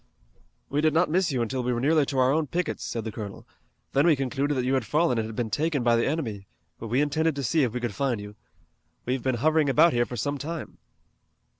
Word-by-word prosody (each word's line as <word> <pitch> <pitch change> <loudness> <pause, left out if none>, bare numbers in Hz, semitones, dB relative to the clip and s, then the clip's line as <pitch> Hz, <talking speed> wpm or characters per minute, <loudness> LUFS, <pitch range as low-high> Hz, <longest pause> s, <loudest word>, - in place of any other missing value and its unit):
"We 145 +2 0
did 155 0 +2
not 165 -1 +3
miss 180 -1 +2
you 125 -3 0
until 130 +3 -2
we 125 0 -1
were 120 - -1
nearly 150 +2 +3
to 140 - -3
our 130 0 +4
own 155 +1 +1
pickets," 180 +5 -2
said 115 - -4
the 110 - -4
colonel. 105 -2 -8 0.5
"Then 140 +4 +4
we 160 - +5
concluded 140 +2 -1
that 125 - 0
you 130 - +1
had 130 -2 +1
fallen 150 -1 +1
and 110 - -2
had 110 - -8
been 115 -2 -2
taken 150 0 0
by 120 -1 +4
the 115 - +1
enemy, 115 - -3 0.3
but 115 - -6
we 125 +5 +1
intended 155 +1 +1
to 140 - -3
see 155 +6 +2
if 125 -5 +1
we - - -1
could 120 -3 -3
find 130 -2 -1
you. 105 0 -8 0.7
We've 125 +1 -1
been 130 0 0
hovering 155 +4 +2
about 160 +5 +5
here 120 -1 +1
for 120 - -6
some 145 +5 -2
time." 165 +2 -6
135 Hz, 250 wpm, -26 LUFS, 120-155 Hz, 0.7 s, we